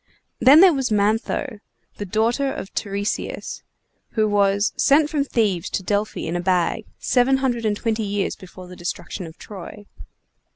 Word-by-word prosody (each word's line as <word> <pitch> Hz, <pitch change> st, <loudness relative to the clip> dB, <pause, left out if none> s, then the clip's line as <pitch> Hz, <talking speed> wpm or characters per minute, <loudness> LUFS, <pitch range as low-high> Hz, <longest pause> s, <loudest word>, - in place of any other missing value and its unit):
Then 285 Hz, +5 st, +8 dB
there 375 Hz, -3 st, +7 dB
was 265 Hz, -3 st, -1 dB
Mantho, 215 Hz, +3 st, 0 dB, 0.4 s
the 205 Hz, -, -5 dB
daughter 235 Hz, +7 st, +1 dB
of 195 Hz, -, -7 dB
Tiresias, 200 Hz, 0 st, -3 dB, 0.5 s
who 215 Hz, -2 st, +2 dB
was 200 Hz, 0 st, +2 dB
sent 295 Hz, +2 st, +3 dB
from 295 Hz, -3 st, +1 dB
Thebes 210 Hz, -10 st, 0 dB
to 190 Hz, -, -3 dB
Delphi 205 Hz, +2 st, -1 dB
in 165 Hz, -, -3 dB
a -, -, 0 dB
bag, 180 Hz, -1 st, 0 dB
seven 255 Hz, +1 st, +2 dB
hundred 245 Hz, -4 st, -1 dB
and 205 Hz, -1 st, 0 dB
twenty 225 Hz, 0 st, -1 dB
years 205 Hz, -1 st, -2 dB
before 185 Hz, 0 st, -12 dB
the 180 Hz, -, -11 dB
destruction 175 Hz, +1 st, -5 dB
of 160 Hz, -, -13 dB
Troy. 205 Hz, +1 st, -10 dB
210 Hz, 160 wpm, -22 LUFS, 195-250 Hz, 0.5 s, Then